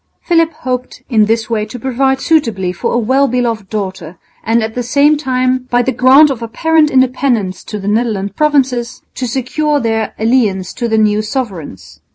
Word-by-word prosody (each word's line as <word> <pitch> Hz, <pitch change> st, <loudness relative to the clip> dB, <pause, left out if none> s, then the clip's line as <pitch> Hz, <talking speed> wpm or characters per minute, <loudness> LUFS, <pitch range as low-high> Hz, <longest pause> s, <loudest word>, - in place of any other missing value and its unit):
Philip 330 Hz, -2 st, +2 dB
hoped 255 Hz, 0 st, -4 dB
in 220 Hz, -4 st, +3 dB
this 225 Hz, 0 st, 0 dB
way 225 Hz, -2 st, -1 dB
to 230 Hz, -, -8 dB
provide 265 Hz, +2 st, 0 dB
suitably 225 Hz, -, 0 dB
for -, -, -3 dB
a -, -, +1 dB
well 260 Hz, +4 st, +2 dB
beloved 230 Hz, -5 st, -2 dB
daughter 190 Hz, -5 st, -5 dB, 0.3 s
and 230 Hz, 0 st, +1 dB
at 220 Hz, 0 st, -4 dB
the 250 Hz, -, -3 dB
same 285 Hz, +5 st, +3 dB
time, 255 Hz, -3 st, -1 dB
by 245 Hz, 0 st, +2 dB
the 260 Hz, -, 0 dB
grant 260 Hz, +4 st, +5 dB
of 250 Hz, -4 st, -5 dB
apparent 310 Hz, +7 st, +1 dB
independence 255 Hz, -7 st, 0 dB
to 210 Hz, -, -5 dB
the 200 Hz, -1 st, -6 dB
Netherland 210 Hz, -2 st, -1 dB
provinces, 265 Hz, -6 st, 0 dB
to 255 Hz, -, -4 dB
secure 285 Hz, +5 st, -1 dB
their 225 Hz, -3 st, -2 dB
allegiance 220 Hz, -5 st, 0 dB
to 240 Hz, -, -3 dB
the 220 Hz, -1 st, 0 dB
new 210 Hz, -1 st, +2 dB
sovereigns. 170 Hz, -, -6 dB
240 Hz, 180 wpm, -14 LUFS, 215-265 Hz, 0.3 s, grant